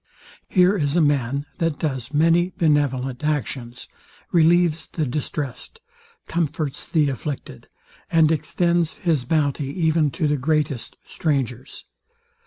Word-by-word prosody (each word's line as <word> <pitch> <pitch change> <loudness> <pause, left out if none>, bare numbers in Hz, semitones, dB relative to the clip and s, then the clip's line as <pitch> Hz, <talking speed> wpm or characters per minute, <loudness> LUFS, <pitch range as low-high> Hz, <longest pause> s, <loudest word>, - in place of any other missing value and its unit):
Here 185 +2 +4
is 145 -5 0
a - - +4
man, 140 -2 +1
that 165 -3 0
does 135 -4 -3
many 165 +4 +3
benevolent 135 -5 +1
actions; 135 -5 -3 0.4
relieves 170 -1 +3
the 155 - -2
distressed, 140 - -4 0.5
comforts 155 -4 -2
the 155 -4 +2
afflicted, 135 - -6 0.4
and 160 -1 +5
extends 170 +2 0
his 155 -8 0
bounty 145 -1 0
even 160 0 +1
to 155 +2 -1
the 145 0 +1
greatest 145 -3 -1
strangers. 135 -5 -3
150 Hz, 115 wpm, -22 LUFS, 135-165 Hz, 0.5 s, and